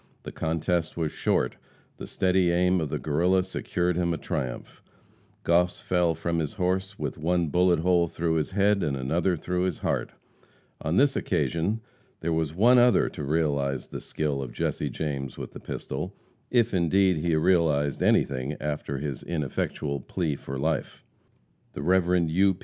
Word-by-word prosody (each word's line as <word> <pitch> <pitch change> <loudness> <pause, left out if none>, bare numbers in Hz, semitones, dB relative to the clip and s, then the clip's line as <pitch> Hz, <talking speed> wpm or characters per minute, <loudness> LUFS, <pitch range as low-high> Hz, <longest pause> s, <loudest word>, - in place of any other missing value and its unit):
The - - -7
contest 80 +1 -1
was 80 -3 -1
short; - - 0 0.4
the - - -7
steady 95 -1 +2
aim 90 +1 +2
of 80 - -2
the - - -2
Guerrilla 90 +5 +2
secured 90 -1 -1
him 85 -1 +1
a - - -4
triumph. 65 -4 -5 0.6
Goss 90 +1 +2
fell 90 -2 +1
from 85 +1 -1
his 75 -3 -2
horse 95 +1 -1
with 90 - -4
one 85 0 +1
bullet 90 0 +3
hole 85 -1 +3
through 85 0 -1
his 75 - -1
head 100 +1 +2
and 70 -2 -1
another 85 +8 0
through 90 +3 -2
his 90 -3 -1
heart. - - -1 0.7
On 80 +3 -1
this 140 +5 +4
occasion 85 +6 0 0.4
there 85 0 0
was 80 -2 0
one 120 +6 +6
other 120 -4 +4
to - - -7
realize 70 -3 0
the - - -6
skill 75 -3 -2
of 65 -2 -6
Jesse - - -2
James 70 -4 -4
with - - -6
the - - -9
pistol, - - -5 0.3
if 120 -2 +2
indeed 95 +1 +3
he 85 +1 +1
realized 80 -4 +2
anything 70 +2 +1
after 75 -1 -3
his 70 -1 -4
ineffectual 70 -2 -2
plea 80 +1 -2
for 70 0 -6
life. 80 +4 -2 0.7
The - - -5
Rev. 90 -2 +3
U. 95 +3 +3
85 Hz, 165 wpm, -27 LUFS, 75-90 Hz, 0.7 s, one